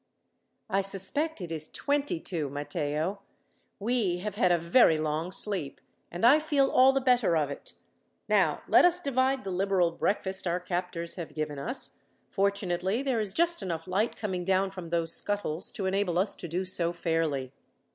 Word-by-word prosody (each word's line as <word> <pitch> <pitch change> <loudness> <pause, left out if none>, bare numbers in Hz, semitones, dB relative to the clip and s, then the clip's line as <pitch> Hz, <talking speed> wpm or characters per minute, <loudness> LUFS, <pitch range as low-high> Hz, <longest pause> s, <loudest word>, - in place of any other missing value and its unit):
"I 195 +1 +1
suspect 195 - -1
it 170 -2 -6
is 155 -1 -1
twenty 285 - -1
two, 160 -5 -2
Matteo. 150 +6 -3 0.6
We 210 -4 0
have 205 +3 -5
had 200 -4 +2
a 175 - +4
very 170 0 +4
long 155 +3 -2
sleep, 190 -8 -1 0.3
and 175 +6 -1
I 280 +6 +7
feel 290 -3 +1
all 260 +1 +6
the 270 - +1
better 245 -9 +2
of 145 -2 0
it. - - -8 0.5
Now, - - +2
let - - +6
us 355 0 +4
divide 265 -4 0
the 195 - -5
liberal 185 -2 +1
breakfast 190 +1 -1
our 175 +1 0
captors 180 -1 -3
have 170 -3 -7
given 150 -2 -3
us; 245 - -2 0.3
fortunately 195 +2 0
there 260 -4 0
is 210 -3 0
just 340 - +1
enough 165 -3 -4
light 200 +5 0
coming 185 -4 -3
down 190 +1 +1
from 185 -3 -8
those 165 -1 +1
scuttles 200 -5 0
to 195 - -4
enable 190 -2 0
us 195 +3 +3
to 175 - -8
do 180 +3 -2
so 175 -2 +2
fairly." 160 -6 -1
190 Hz, 175 wpm, -28 LUFS, 170-215 Hz, 0.6 s, I